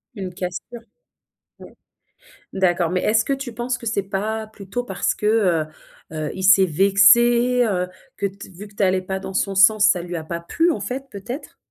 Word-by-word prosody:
Une 190 -3 -6
cassure, 180 +7 -6 0.8
ouais. - - -13 0.8
D'accord, 175 -3 +1
mais 185 0 -1
est-ce 220 +1 +2
que - - -1
tu 270 -3 -5
penses 240 +2 -3
que 235 - -11
c'est 215 -2 0
pas 215 +3 -3
plutôt 215 +2 -6
parce - - -1
que, 210 - -4
heu 185 -8 +2 0.5
heu 155 -1 -4
il 190 - -6
s'est 190 0 +6
vexé? 235 +8 +4
Heu, 180 -4 -1 0.3
que 200 - -1
t 195 0 -9
vu 195 +3 -11
que 200 - -22
tu 205 - -3
allais 185 -1 +2
pas 190 +1 -4
dans 190 0 -8
son 195 +1 0
sens, 210 +2 +5
ça 180 -4 +2
lui 175 0 -5
a 160 - -6
pas 170 +2 -5
plu 330 - 0
en 310 - -2
fait 255 +7 -5
peut-être? 230 +9 -8
200 Hz, 200 wpm, -21 LUFS, 185-225 Hz, 0.8 s, s'est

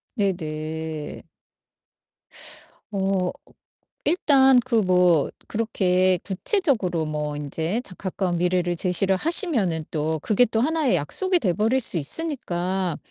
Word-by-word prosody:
네네. 160 -5 -4 1.7
어. 190 -2 0 0.7
일단 270 -6 +4
그 235 -3 +2
뭐 180 -4 +3 0.2
그렇게 185 -4 +1
구체적으로 200 - 0
뭐 150 -1 -3
인제 160 - -3
자 185 - -12
가까운 185 -2 -2
미래를 175 0 +1
제시를 190 +2 +1
하시면은 225 - +2
또 160 0 -1
그게 220 +7 +3
또 225 +1 -1
하나의 310 - +1
약속이 360 - 0
돼 185 - 0
버릴 225 +5 +1
수 185 -7 +1
있으니까 185 - -2
185 Hz, 230 characters per minute, -23 LUFS, 165-230 Hz, 1.7 s, 일단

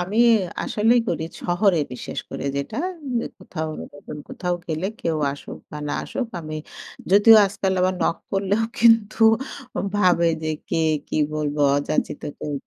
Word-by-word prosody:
আমি 185 +4 -3 0.5
আসলেই 225 +3 +3
করি 160 - -1 0.2
শহরে, 175 0 +2
বিশেষ 125 - -6
করে - - -5
যেটা 140 - -4 0.3
উম 250 -3 0 0.2
কোথাও, 160 -4 -5 0.3
নতুন 145 +1 -9
কোথাও 180 -1 -2
গেলে 160 +3 -2
কেউ 165 -1 0 0.2
আসুক 145 - -9
বা 150 - -6
না - - -2
আসুক, 255 - -3
আমি 155 -1 -6 0.6
যদিও 205 +3 +8
আজকাল 195 -1 -1
আবার 185 +1 +2
নক 170 - +1
করলেও 200 +3 +1 0.2
কিন্তু 225 -2 +4 0.8
ভাবে 180 -4 +4 0.2
যে, 155 - -2 0.2
কে - - -1 0.3
কি - - -3 0.2
বলবো 150 -1 -2 0.2
অযাচিত 145 +1 -1 0.2
কেউ। 150 - -4
180 Hz, 145 wpm, -23 LUFS, 155-205 Hz, 0.8 s, যদিও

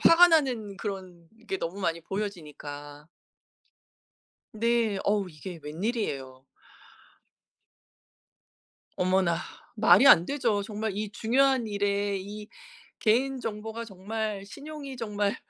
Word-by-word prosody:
화가 350 +1 +8
나는 245 - +1
그런 185 -5 -6 0.2
게 190 - -2
너무 180 +5 -4
많이 170 -3 0
보여지니까. 150 -6 -6 1.5
네 230 -2 +1
어우 200 -2 +1
이게 165 +2 -9
웬일이에요? 150 - -3 2.5
어머나, 185 -2 +2 0.4
말이 225 +4 +6
안 170 -7 +9
되죠. 240 -8 0
정말 215 0 -3
이 210 0 -3
중요한 255 +3 +2
일에 200 -1 0
이 210 +2 -8 0.5
개인 255 +4 +2
정보가 225 +1 -5
정말 205 0 -4
신용이 280 +4 -8
정말 210 -3 -1
205 Hz, 215 characters per minute, -28 LUFS, 185-230 Hz, 2.5 s, 안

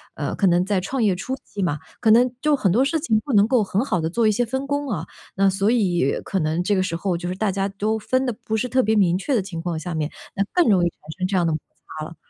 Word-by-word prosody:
呃， - - -3
可 195 - +2
能 175 0 +3
在 200 -1 +1
创 250 +6 -2
业 200 -4 +3
初 255 +9 -4
期 200 - -6
嘛， 165 -5 0 0.2
可 225 - +2
能 240 +2 +5
就 300 -1 +3
很 200 -9 +1
多 235 +8 +3
事 320 +4 0
情 225 -8 +1
不 280 - -3
能 205 0 +5
够 245 -2 +3
很 195 +3 0
好 180 -10 0
地 160 - -1
做 225 +6 +1
一 215 - +4
些 245 +4 +1
分 265 +4 -3
工 285 0 -2
啊， 175 -8 -3 0.3
那 195 +1 +3
所 195 +2 +1
以 180 - +1
可 195 - -1
能 160 +2 0
这 205 +3 +1
个 185 - +2
时 185 -3 -2
候 180 +1 -1
就 175 +1 -4
是 180 - -3
大 205 +1 0
家 195 +1 -1
都 210 +3 -1
分 255 +4 0
得 245 - -1
不 220 - -1
是 235 - -1
特 260 +2 +2
别 220 -1 +1
明 185 -5 +3
确 260 +8 -1
的 220 - +2
情 170 -4 -6
况 170 -1 -3
下 170 +2 -5
面， 155 -1 -2 0.3
那 200 - +1
更 355 -3 +3
容 185 -3 +4
易 175 - +2
产 - - -26 0.2
生 185 - 0
这 190 0 0
样 175 - +2
的 165 - +1
摩 155 - -1 0.4
擦 155 - -4
了。 165 - -10
200 Hz, 325 characters per minute, -22 LUFS, 180-235 Hz, 0.4 s, 能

